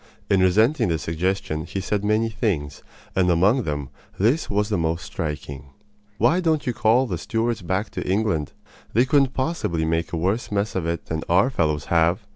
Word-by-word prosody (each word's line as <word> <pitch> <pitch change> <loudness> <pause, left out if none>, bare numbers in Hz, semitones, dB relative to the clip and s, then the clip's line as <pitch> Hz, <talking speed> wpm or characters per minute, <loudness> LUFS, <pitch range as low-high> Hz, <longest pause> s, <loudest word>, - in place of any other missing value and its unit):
In 100 - +4
resenting 110 +8 +3
the 80 -2 +1
suggestion 80 0 -2
he 100 - -4
said 100 +1 -2
many 110 +2 +1
things, 90 - -2 0.3
and 90 -1 +3
among 100 +9 +3
them 75 -3 -3 0.3
this 120 - +1
was 105 +1 0
the 105 - 0
most 80 0 -1
striking: 70 -1 -5 0.5
"Why 120 - +3
don't 160 -4 +1
you 125 - 0
call 115 +4 +3
the 90 -9 -3
Stuarts 115 +2 -1
back 95 +4 -2
to - - -4
England? 95 -7 0 0.4
They 120 +4 +4
couldn't 135 -1 +2
possibly 130 - -1
make 80 +1 -1
a 85 - -2
worse 95 +9 -1
mess 100 +1 -1
of 90 -3 -2
it 85 -1 -3
than 80 -1 -3
our 95 +10 +4
fellows 75 - 0
have!" 85 +5 +2
95 Hz, 185 wpm, -23 LUFS, 80-115 Hz, 0.5 s, In